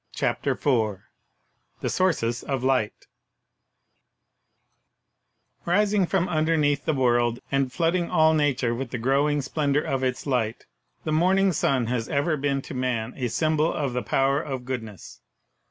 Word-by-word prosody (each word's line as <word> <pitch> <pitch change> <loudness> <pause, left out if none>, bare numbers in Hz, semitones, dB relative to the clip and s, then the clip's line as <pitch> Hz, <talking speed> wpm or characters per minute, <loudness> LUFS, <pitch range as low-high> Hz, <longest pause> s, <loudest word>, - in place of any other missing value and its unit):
CHAPTER - - 0
IV 110 -8 0 0.8
THE - - -1
SOURCES 120 -11 0
OF 135 -3 -3
LIGHT 130 -5 0 2.6
Rising 200 +1 +2
from 185 -1 +1
underneath 155 -3 +1
the 155 - +1
world, 120 -2 +2
and 135 -2 +1
flooding 170 +3 0
all 160 0 +4
nature 135 -6 +1
with 125 +1 -4
the 125 - -4
growing 140 +4 +1
splendor 145 +1 0
of 135 -1 -2
its 130 0 -2
Light, 120 -5 -1 0.4
the 155 - -2
morn 180 +5 +3
ing 195 0 +3
sun 135 -4 +1
has 115 -1 -2
ever 155 +3 +1
been 140 -1 -1
to - - -8
man 125 -2 -2
a 125 -3 -2
symbol 155 +6 +1
of 140 -5 -2
the 125 - -1
power 135 +6 +1
of 130 -5 -5
goodness. 110 -7 -7
135 Hz, 145 wpm, -25 LUFS, 125-155 Hz, 2.6 s, all